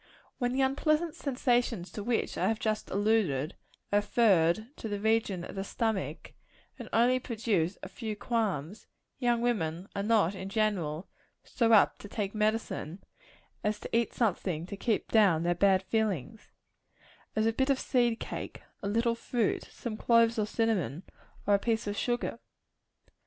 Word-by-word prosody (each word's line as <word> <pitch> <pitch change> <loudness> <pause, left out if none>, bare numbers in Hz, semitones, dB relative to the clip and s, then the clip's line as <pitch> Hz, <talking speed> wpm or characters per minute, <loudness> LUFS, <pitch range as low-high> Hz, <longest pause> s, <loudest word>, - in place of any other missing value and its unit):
When 245 -2 +1
the 265 +2 +1
unpleasant 305 +4 +1
sensations 245 - 0
to 210 - -5
which 235 +1 -1
I 185 - +1
have 220 +1 +1
just 215 -1 -1
alluded, 195 -8 +1 0.4
are - - +6
referred 205 - +2
to - - -5
the 205 -1 -2
region 220 -4 +1
of - - -7
the 195 - -3
stomach, 220 -1 -3 0.5
and - - -8
only 245 +3 +4
produce 215 -8 -1
a - - -4
few 215 +3 -5
qualms, 210 - -2 0.3
young 240 -2 +2
women 185 -7 -1
are 200 - -1
not, 205 -4 +3
in 190 0 -6
general, 195 -7 -1 0.4
so 230 -2 +1
apt 210 - +5
to - - -9
take 205 -1 -3
medicine, 215 -5 -1 0.6
as 210 0 0
to - - -4
eat 230 -1 +2
something 180 -7 0
to 195 - -6
keep 215 +2 -1
down 195 -8 +4
their 175 0 +2
bad 190 +1 +3
feelings 215 - -2 0.8
as 215 0 +2
a 225 - +2
bit 265 +4 0
of 275 - +4
seed 240 -3 +1
cake, - - -6 0.2
a 200 - -3
little 230 +3 +2
fruit, 230 -1 -1
some 225 -3 -6
cloves 230 -1 +4
or 210 - +1
cinnamon, 205 - 0 0.4
or 205 - +3
a 200 - +5
piece 225 0 0
of 205 0 -2
sugar. 240 +1 -1
215 Hz, 160 wpm, -30 LUFS, 195-230 Hz, 0.8 s, are